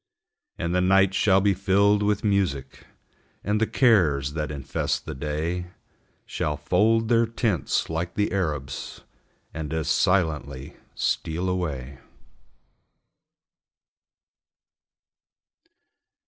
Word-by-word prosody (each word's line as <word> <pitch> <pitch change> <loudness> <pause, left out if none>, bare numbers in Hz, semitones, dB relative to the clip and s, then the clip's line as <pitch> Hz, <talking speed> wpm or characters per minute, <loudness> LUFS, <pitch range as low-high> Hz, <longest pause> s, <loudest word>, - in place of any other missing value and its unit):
And 85 +1 -2
the 90 - +2
night 95 +1 +4
shall 95 -1 +3
be 100 0 +3
filled 100 +2 +2
with 105 -1 0
music 90 -11 -1 0.6
And 105 +2 0
the 110 - +3
cares, 75 - +3
that 75 -1 -3
infest 70 -2 -3
the - - -5
day, 80 +6 -3 0.6
Shall 75 -1 -2
fold 110 +9 +2
their 115 0 +3
tents, 110 - -1
like 85 +2 -3
the 105 - 0
Arabs, 75 -8 -3 0.5
And 80 -1 -5
as 80 -1 -2
silently 75 -8 0 0.2
steal 85 +3 -1
away. 70 -8 -3
90 Hz, 100 wpm, -25 LUFS, 75-100 Hz, 0.6 s, night